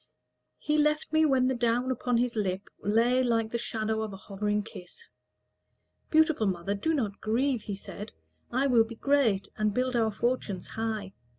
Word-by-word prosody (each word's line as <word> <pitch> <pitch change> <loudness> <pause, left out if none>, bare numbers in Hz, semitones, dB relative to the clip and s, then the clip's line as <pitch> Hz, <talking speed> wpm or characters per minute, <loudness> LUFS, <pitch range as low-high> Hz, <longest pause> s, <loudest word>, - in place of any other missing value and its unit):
He 300 0 0
left 300 +1 +1
me 315 0 +5
when 265 -3 +3
the 260 - +1
down 245 +1 +1
upon 245 -1 0
his 240 0 0
lip 195 -2 -2
Lay 235 +5 +3
like 225 -3 +1
the 235 - -1
shadow 220 -1 -2
of 220 -1 -3
a - - -7
hovering 210 +1 -2
kiss. 220 - -12 1.0
"Beautiful 315 -8 +3
mother, 185 +1 -1
do 320 +11 0
not 215 -8 -2
grieve," 245 +3 +1
he 205 - -5
said; 205 +1 -8 0.4
"I 260 +3 +1
will 245 -4 +5
be 230 +1 -9
great, 235 -7 +2
and 215 -1 0
build 255 0 0
our 225 -2 +3
fortunes 210 -3 -2
high. 220 -3 -3
230 Hz, 175 wpm, -28 LUFS, 210-255 Hz, 1.0 s, me